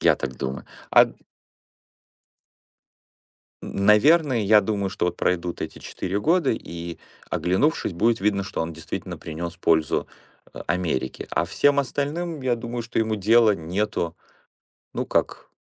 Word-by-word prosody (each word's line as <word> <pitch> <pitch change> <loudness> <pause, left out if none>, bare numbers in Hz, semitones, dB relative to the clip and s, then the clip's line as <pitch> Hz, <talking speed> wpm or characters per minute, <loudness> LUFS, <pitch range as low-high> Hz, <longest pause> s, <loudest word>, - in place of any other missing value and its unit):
Я - - +5
так 65 -2 -5
думаю. 65 0 -4 0.3
А - - +7 2.6
Н 100 - -3
наверное, 135 +3 +5
я 105 +1 +6
думаю, 100 -3 -1
что 100 -3 -1
вот 90 - -2
пройдут 90 -1 -1
эти - - -5
4 95 +2 -4
года, 165 - +3
и, 85 -5 -5 0.3
оглянувшись, 95 - +1
будет 115 +6 +1
видно, 100 -1 +1
что 100 - -4
он 80 0 -4
действительно 80 0 -6
принес 85 +2 -6
пользу 80 -2 +1 0.5
А - - -8
Америке. 85 -7 -2
А 85 - +1
всем 140 +10 +2
остальным, 145 +4 -2
я 125 -2 +1
думаю, 120 0 -5
что 115 - -4
ему 110 -1 +1
дела 110 +2 +5
нету. 85 0 -2 0.8
Ну - - -2
как - - -1
100 Hz, 140 wpm, -24 LUFS, 85-120 Hz, 2.6 s, А